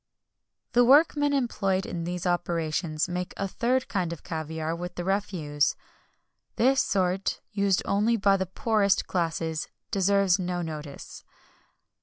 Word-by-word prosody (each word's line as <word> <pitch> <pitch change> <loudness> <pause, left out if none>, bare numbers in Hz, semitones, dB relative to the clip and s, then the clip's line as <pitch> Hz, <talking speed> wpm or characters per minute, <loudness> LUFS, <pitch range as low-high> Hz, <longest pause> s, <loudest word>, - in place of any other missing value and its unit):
The 245 - +5
workmen 290 +2 +5
employed 200 -8 0
in 170 -1 -4
these 180 +1 -4
operations 165 -2 -1
make 180 0 -4
a 195 - -1
third 250 +6 0
kind 185 -5 -1
of 170 - -7
caviar 160 0 -3
with 175 +1 -6
the 175 - -4
refuse. 175 -7 0 0.8
This 265 +3 +4
sort, 190 0 0
used 200 -3 +1
only 215 +4 +2
by 195 -1 +3
the 190 -1 -2
poorest 210 -2 +1
classes, 165 -2 -2 0.2
deserves 195 -1 +3
no 180 -1 -2
notice. 150 -3 -8
185 Hz, 130 wpm, -27 LUFS, 170-200 Hz, 0.8 s, The